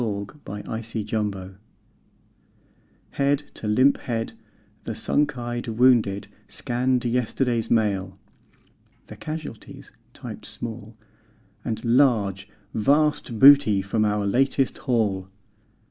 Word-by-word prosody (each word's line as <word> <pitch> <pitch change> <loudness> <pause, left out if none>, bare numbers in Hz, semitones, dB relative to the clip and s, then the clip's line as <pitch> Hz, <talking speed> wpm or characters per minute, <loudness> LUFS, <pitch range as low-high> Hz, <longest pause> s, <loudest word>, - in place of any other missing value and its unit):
Smile, 100 -3 -2 0.4
Smile, 110 - -4
Smile 105 -4 -3 1.6
Head 140 +1 +1
to 110 - -5
limp 130 +6 +4
head, 115 -2 -3 0.5
the - - -5
sunk 145 -2 0
eyed 120 0 -4
wounded 110 -4 +3 0.2
scanned 125 0 -1
Yesterday's 120 0 0
Mail; 100 -4 0 0.9
the - - -11
casualties 155 -7 -8 0.2
(typed - - -9
small) 115 -1 -7 0.7
And 110 +1 -4
(large) 110 -6 +2 0.2
Vast 140 +1 +1
Booty 135 -6 +7
from 105 +3 0
our 105 -1 0
Latest 135 +5 +1
Haul. 105 -6 0
115 Hz, 100 wpm, -24 LUFS, 105-130 Hz, 1.6 s, Booty